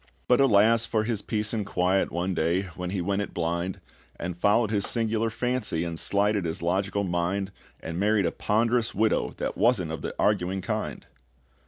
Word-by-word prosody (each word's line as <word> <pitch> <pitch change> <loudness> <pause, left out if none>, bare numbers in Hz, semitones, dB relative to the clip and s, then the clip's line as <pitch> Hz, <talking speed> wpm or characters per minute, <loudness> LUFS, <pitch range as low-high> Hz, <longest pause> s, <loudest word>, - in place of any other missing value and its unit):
But 125 +2 +4
alas 115 -2 +4
for 110 -2 +1
his 110 -2 -2
peace 105 0 -2
and 110 -2 -1
quiet, 95 0 +1
One 90 +2 -1
day, 85 +3 +1
when 90 -1 -4
he 95 -1 -2
went 100 +3 0
it 100 - -6
blind, 85 +2 -2 0.4
And 90 0 -5
followed 105 +5 +2
his 100 -2 +2
singular 115 -1 0
fancy, 120 -7 -1
And 85 -1 -4
slighted 100 0 +1
his 80 0 -3
logical 95 +3 0
mind, 95 +2 -1 0.3
And 80 +2 -5
married 105 -1 +2
a 85 - +1
ponderous 115 +2 +1
widow 110 +1 +1
that - - -3
wasn't 105 -7 +2
of 80 - -5
the - - -5
arguing 95 +2 +1
kind! - - -4
100 Hz, 180 wpm, -26 LUFS, 90-110 Hz, 0.4 s, But